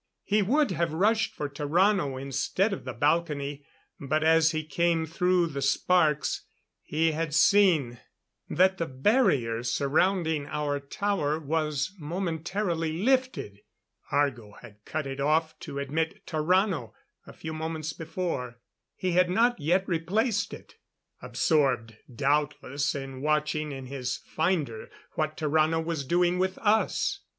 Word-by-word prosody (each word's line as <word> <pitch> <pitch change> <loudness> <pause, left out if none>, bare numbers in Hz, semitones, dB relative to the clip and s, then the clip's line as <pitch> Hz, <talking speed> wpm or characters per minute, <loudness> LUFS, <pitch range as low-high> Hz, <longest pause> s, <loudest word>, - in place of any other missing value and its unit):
He 210 +1 +2
would 270 +5 +2
have 170 -2 -1
rushed 215 +6 +2
for 145 - -3
Tarrano 150 +1 +1
instead 140 - 0
of - - -6
the - - -4
balcony, 145 -2 0 0.4
but 155 +3 0
as 160 0 +5
he 155 -1 -2
came 165 +2 +1
through 180 +2 +2
the 140 -4 -4
sparks 150 +2 +2 0.4
he 160 +2 +1
had 155 -1 -2
seen 165 - +4 0.5
that 185 +3 +3
the 165 - -1
barrier 130 - +2
surrounding 155 +5 +1
our 150 -1 -2
tower 150 +1 -1
was 155 +1 -1
momentarily 170 +1 -2
lifted. 255 - 0 0.5
Argo 120 -8 0
had 105 -1 -14
cut 155 -2 -3
it 135 0 -5
off 155 +3 +1
to 140 - -7
admit 155 +4 -2
Tarrano 165 - +1 0.3
a - - -11
few 160 - -7
moments 160 -1 -4
before. 160 -7 -4 0.4
He 185 - -2
had 180 +1 +3
not 235 +6 +2
yet 180 +6 +1
replaced 205 +6 0
it - - -12 0.4
absorbed, 135 -8 +1 0.2
doubtless, 145 +2 0
in 135 -1 -6
watching 150 0 0
in 135 -1 -7
his 125 -2 -3
finder 155 -9 -2 0.2
what 155 -1 -2
Tarrano 155 +1 +2
was 160 -3 -2
doing 175 +4 +2
with 185 0 0
us. 220 0 +1
155 Hz, 130 wpm, -27 LUFS, 140-180 Hz, 0.5 s, as